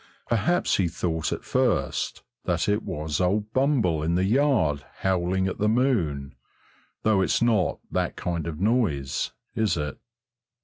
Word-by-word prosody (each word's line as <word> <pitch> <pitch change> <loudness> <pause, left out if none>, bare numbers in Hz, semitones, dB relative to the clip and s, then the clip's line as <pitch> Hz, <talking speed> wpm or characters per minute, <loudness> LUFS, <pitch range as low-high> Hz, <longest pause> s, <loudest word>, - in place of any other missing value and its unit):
Perhaps 160 - +2
he 95 - +2
thought 80 -1 -2
at - - -3
first 120 - 0 0.2
that 85 -1 0
it 105 +2 +2
was 75 -6 -3
old 105 +4 0
Bumble 130 - +2
in 85 +2 0
the 90 - +2
yard 110 - +2 0.2
howling 95 0 +1
at 95 - -4
the 105 +1 +2
moon, 95 - +1 0.7
though 105 -3 +3
it's - - +2
not 115 -6 +2
that - - -1
kind 85 -2 -3
of 80 -2 -5
noise, 95 - 0 0.2
is 110 -5 +1
it? 75 -2 -4
95 Hz, 145 wpm, -26 LUFS, 80-110 Hz, 0.7 s, though